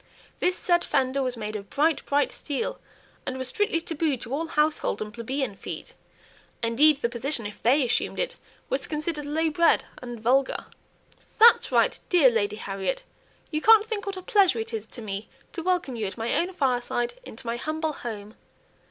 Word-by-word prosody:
This 365 0 +2
said 345 -1 +2
fender 260 +1 +1
was 255 -2 -1
made 215 -1 -5
of 200 -1 -6
bright, 310 +2 +1
bright 285 0 +2
steel, 285 -3 -3 0.4
and 260 - -4
was 260 -1 -2
strictly 410 +1 +1
tabooed 315 -6 -1
to 235 - -6
all 320 +4 -1
household 305 -1 +1
and 215 0 -5
plebeian 245 +1 -2
feet; - - -7 0.7
indeed 275 +6 +5
the - - +4
position, 240 0 -3
if 205 0 -7
they 265 +4 +4
assumed 245 - 0
it, - - -1 0.3
was - - -1
considered 300 -1 -3
low 315 +2 0
bred 335 +2 +3 0.2
and 240 -2 -7
vulgar. 260 +4 +1 0.7
"That's 460 +2 +7
right, - - +3
dear 315 -9 +6
Lady 210 -2 0
Harriet! 200 - -3 0.5
you 305 -1 -1
can't 440 +1 +7
think 435 -3 -4
what 395 -1 -3
a 370 - -7
pleasure 385 - +4
it 225 0 -4
is 220 -1 -4
to 235 - -8
me 200 0 -4 0.2
to 340 - -4
welcome 350 -7 0
you 220 -3 -2
at 190 - -7
my 230 +1 -1
own 355 +2 +1
fireside, 245 -6 0
into 240 - -11
my 235 0 -2
humble 310 +3 -2
home." 215 -5 -7
275 Hz, 185 wpm, -26 LUFS, 230-325 Hz, 0.7 s, That's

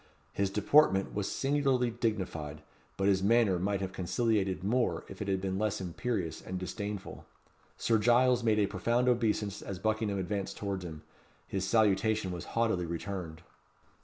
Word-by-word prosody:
His 100 -1 0
deportment 100 0 +3
was 105 -1 -2
singularly 135 -3 +1
dignified; 90 -10 -3 0.3
but 95 - +1
his 95 -1 +3
manner 105 -3 +3
might 100 +2 -1
have 95 0 -4
conciliated 95 0 0
more 120 +5 0
if - - -10
it 105 - -3
had 95 -1 +1
been 95 0 -2
less 105 0 0
imperious 95 -1 -3
and 95 - -5
disdainful. 100 +2 -5 0.5
Sir 115 -2 +2
Giles 120 +2 +4
made 110 -2 +3
a 105 - +4
profound 120 +5 0
obeisance 110 -4 +1
as 95 - -5
Buckingham 110 0 0
advanced 95 +1 -3
towards 100 -2 -3
him. 80 -3 -8 0.4
His 95 -1 -2
salutation 110 -2 +2
was 90 -2 -5
haughtily 110 -7 +1
returned. 85 -2 -5
100 Hz, 155 wpm, -31 LUFS, 95-115 Hz, 0.5 s, Giles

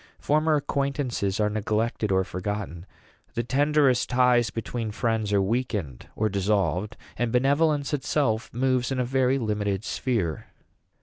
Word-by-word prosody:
Former 155 +1 +2
acquaintances 140 -8 -1
are 105 - +3
neglected 110 0 -1
or 95 0 +3
forgotten; 90 -1 -5 0.5
the 120 - 0
tenderest 140 0 +2
ties 125 -2 +3
between 115 +2 -4
friends 110 -1 -1
are 100 -1 +3
weakened 105 - -2
or 110 - +1
dissolved; 100 -2 0 0.2
and 120 -1 0
benevolence 140 +4 +2
itself 135 -5 0
moves 130 +1 0
in 130 - -1
a 125 - +1
very 130 +1 +2
limited 105 -4 -1
sphere." 100 - -2
115 Hz, 130 wpm, -26 LUFS, 105-130 Hz, 0.5 s, are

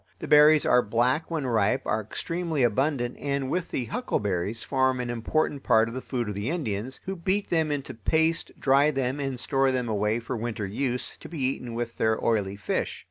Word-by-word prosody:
The - - -7
berries 150 +1 +6
are 125 - +5
black 125 +8 +1
when 160 -4 -2
ripe, 110 -5 +1
are 110 - 0
extremely 165 - -2
abundant, 120 +2 +1
and, 140 -2 -2
with 180 -1 -1
the 125 - -2
huckleberries, 105 - -2
form 130 -1 +1
an 120 -1 -2
important 140 +5 -1
part 110 -3 +4
of 115 - -6
the 130 - -4
food 120 -4 -3
of 105 - -3
the 100 +5 -3
Indians, 130 - -3
who 195 - -3
beat 190 +4 -1
them 160 -3 +2
into 145 -2 -3
paste, 160 +9 +1
dry 140 +2 +4
them, 135 -1 -1
and 135 -3 -3
store 135 +1 +2
them 125 -2 -1
away 105 +1 0
for 120 +2 -5
winter 115 -2 -3
use, 125 +5 -2
to - - -10
be 170 - -7
eaten 130 -3 -2
with 120 0 -4
their 110 0 +2
oily 100 -4 +1
fish. 100 - -2
130 Hz, 200 wpm, -26 LUFS, 115-145 Hz, -, berries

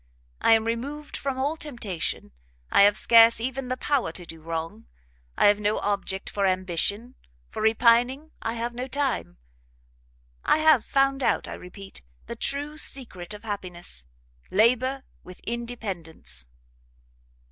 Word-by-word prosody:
I - - +6
am 225 0 +3
removed 280 +6 -4
from 275 -2 -3
all 280 +4 0
temptation, 235 - -4 0.4
I - - +6
have 205 +1 +6
scarce 230 -1 +6
even 260 +2 -3
the 255 +1 -2
power 265 - 0
to 175 - -6
do 165 -1 -11
wrong; 165 -7 -5 0.5
I - - +4
have 205 0 +5
no 210 +1 +1
object 195 -1 -2
for 200 -1 0
ambition, 185 +6 -1 0.4
for - - -5
repining 240 +7 +3
I 225 - -2
have 235 +1 -3
no 250 +2 -4
time: 265 - -2 1.1
I - - +4
have, 310 -7 +5
found 275 0 +2
out, - - +1
I - - -6
repeat, 195 +2 -10 0.2
the - - -6
true 290 +2 -2
secret 210 - -2
of 210 - -12
happiness, 180 - -6 0.4
Labour 255 +6 +2 0.2
with 180 0 -12
Independence." 190 - -5
225 Hz, 140 wpm, -26 LUFS, 190-260 Hz, 1.1 s, I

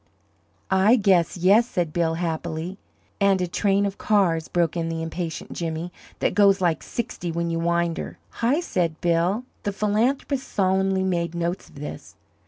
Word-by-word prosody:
"I 190 +5 +5
guess 190 -7 +3
yes," 200 +7 +5
said 170 -8 -2
Bill, 165 -1 +1
happily. 170 +2 -3 0.4
"And 200 -1 +3
a 180 - +1
train 200 +3 +1
of 200 0 -4
cars," 175 -7 +2
broke 170 -2 0
in 165 -1 -1
the 165 0 -3
impatient 165 0 -5
Jimmy, 165 +1 -4 0.3
"that - - +1
goes 200 -1 +5
like 175 -3 +1
sixty 215 -7 -4
when 170 0 -2
you 165 - -1
wind 170 0 0
her?" - - -6 0.2
"Hi!" 260 +8 +2
said 170 - -1
Bill. 175 +6 +1 0.2
The 205 - -2
philanthropist 235 +7 0
solemnly 190 0 +1
made 170 -2 -1
notes 170 +2 -3
of - - -20
this. 145 +1 -8
180 Hz, 165 wpm, -24 LUFS, 170-200 Hz, 0.4 s, I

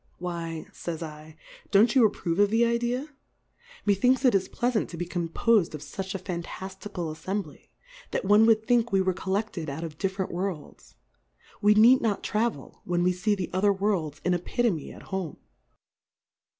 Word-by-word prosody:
Why, 170 -2 -5
fays 170 -2 -5
7, 155 -1 -9 0.3
don't 215 +3 +5
you 250 -5 +6
approve 175 -3 -3
of 205 0 +5
the 225 +2 +3
Idea? 240 +4 -1 0.8
Methinks 250 +7 +3
it 250 - +5
is 195 -1 +1
pleafant 240 -3 0
to 170 - -9
be 175 - -2
composed 175 +2 +1
of 150 - -8
fuch 190 +6 -6
a - - 0
fantaftical 185 -1 -6
Affembly, 195 +5 -5 0.4
that - - -2
one 210 +3 +6
would 220 -1 +4
think 235 -1 +2
we 195 - +3
were 190 0 +1
colleflied 190 -3 -3
out 150 +4 -5
of 155 -2 -7
different 190 -1 -2
Worlds; 175 -4 -5 0.7
we 210 +1 +5
need 240 +5 +7
not 215 -4 0
travel, 215 - -2
when 175 -1 0
we 180 0 +3
fee 205 +4 0
the 185 -3 -4
other 200 +2 +3
Worlds 190 -7 -1
in 180 - +3
Epi 180 +8 -1
tome 175 -11 0
at - - -12
home. 190 -5 -4
195 Hz, 170 wpm, -27 LUFS, 170-215 Hz, 0.8 s, need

